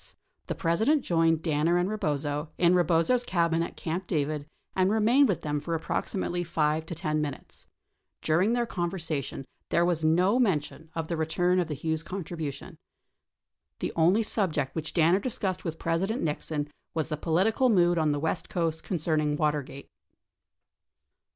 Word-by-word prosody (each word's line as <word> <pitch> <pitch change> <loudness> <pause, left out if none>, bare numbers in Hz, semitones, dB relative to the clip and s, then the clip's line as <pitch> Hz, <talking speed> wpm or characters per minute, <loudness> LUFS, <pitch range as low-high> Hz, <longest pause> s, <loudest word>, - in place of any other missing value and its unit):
The - - -2
President 220 - +2
joined 165 -1 +2
Danner 160 +2 +2
and 175 +1 +1
Eebozo, 150 -7 -2
in 175 0 +4
Eebozo's 175 +8 +3
cabin 170 -5 +1
at 170 - -4
Camp 175 +3 -3
David 150 -2 -1 0.3
and 185 0 +3
remained 225 +6 +4
with 190 - -1
them 150 -1 -1
for 165 +3 -3
approximately 175 +2 -2
5 160 -1 0
to 170 - -4
10 155 -1 -1
minutes. 145 -2 -7 0.6
During 180 +8 +2
their 240 0 +1
conversation, 165 - -3 0.2
there 170 - +3
was 170 -2 0
no 180 +9 +3
men 195 -11 +3
tion 155 +2 -12
of 165 -1 -2
the 170 - -2
return 175 +3 +1
of 175 - 0
the 150 - -3
Hughes 160 +2 -2
contribution. 160 -6 -6 1.0
The - - -3
only 180 +7 +4
subject 160 -11 0
which 155 -2 -5
Danner 170 +2 +4
discussed 195 -5 -2
with 165 -2 -4
President 190 +10 -1
Nixon 150 -1 -2 0.3
was 160 -1 -1
the 155 - -1
political 190 - +2
mood 175 -5 +4
on 155 -1 +2
the 145 - 0
west 160 +2 -2
coast 165 -2 -1
concerning 155 -4 0
Water 150 -1 +1
gate. 135 +1 -11
165 Hz, 160 wpm, -28 LUFS, 155-185 Hz, 1.0 s, in